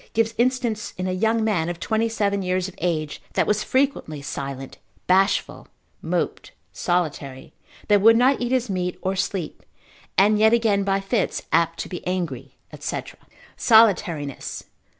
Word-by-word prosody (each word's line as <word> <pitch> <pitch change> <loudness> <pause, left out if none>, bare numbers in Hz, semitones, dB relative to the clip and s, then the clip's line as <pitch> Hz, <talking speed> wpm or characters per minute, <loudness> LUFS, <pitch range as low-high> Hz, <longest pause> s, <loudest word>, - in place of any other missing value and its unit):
gives 225 0 +1
instance 240 -4 0
in 185 - -3
a 185 - -1
young 220 +4 +1
man, 180 -7 0
of 175 -1 -5
twenty 220 +4 0
seven 200 -3 0
years 185 0 -1
of 190 - -10
age, 155 -3 -2
that - - +2
was 210 0 +1
frequently 260 - 0
silent, 135 -1 -6 0.3
bashful, 190 +2 +1 0.3
moped, - - -2 0.2
solitary, 150 -7 -2 0.3
that 205 -2 +4
would 225 +2 +7
not 255 +3 +3
eat 245 0 -1
his 255 -1 +1
meat, 180 -3 -2
or 190 +1 0
sleep, 185 -3 -3 0.6
and 210 +2 +4
yet 220 +1 +5
again 220 -4 +2
by 195 0 +1
fits 195 +1 -1
apt 165 0 +2
to - - -4
be 180 - -7
angry, 170 -9 -3 0.2
&c. - - -3 0.6
_Solitariness. 195 - +2
195 Hz, 150 wpm, -23 LUFS, 175-220 Hz, 0.6 s, would